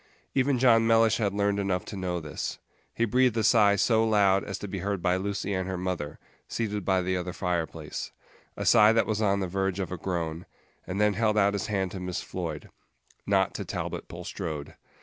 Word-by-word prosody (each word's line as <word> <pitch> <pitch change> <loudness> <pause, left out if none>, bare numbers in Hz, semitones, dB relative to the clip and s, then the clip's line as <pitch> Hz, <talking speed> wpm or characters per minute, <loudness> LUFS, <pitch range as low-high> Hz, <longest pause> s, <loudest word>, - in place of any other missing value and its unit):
Even 135 0 +2
John 115 -2 +5
Mellish 115 -1 +4
had 105 -4 0
learned 100 0 0
enough 95 -2 -1
to - - -7
know 90 -2 -2
this. 75 -2 -5 0.3
He 115 - 0
breathed 125 +1 +2
a 110 - +1
sigh 105 -2 +5
so 110 +3 +3
loud 100 -3 +3
as 100 -2 -5
to 105 - -6
be 95 0 -4
heard 100 +1 -2
by 90 0 +1
Lucy 100 +1 -2
and 95 -1 -2
her 95 - -2
mother, 90 -5 -3 0.3
seated 105 -3 -2
by 95 0 +2
the 95 +1 0
other 90 0 -3
fireplace 85 -4 -3 0.5
a - - -3
sigh 105 +2 +6
that 115 - +3
was 110 0 -1
on 100 -2 +2
the 95 - -1
verge 95 +1 -1
of 95 - -3
a 90 - -3
groan 85 -2 -3 0.4
and 95 +2 -3
then 105 0 +3
held 110 +1 +1
out 100 -1 +4
his 100 - -2
hand 95 -4 -1
to 95 - -6
Miss 90 0 -4
Floyd. 80 -5 -5 0.6
Not - - +2
to - - -4
Talbot - - -5
Bulstrode. 75 -3 -6
100 Hz, 210 wpm, -27 LUFS, 90-105 Hz, 0.6 s, sigh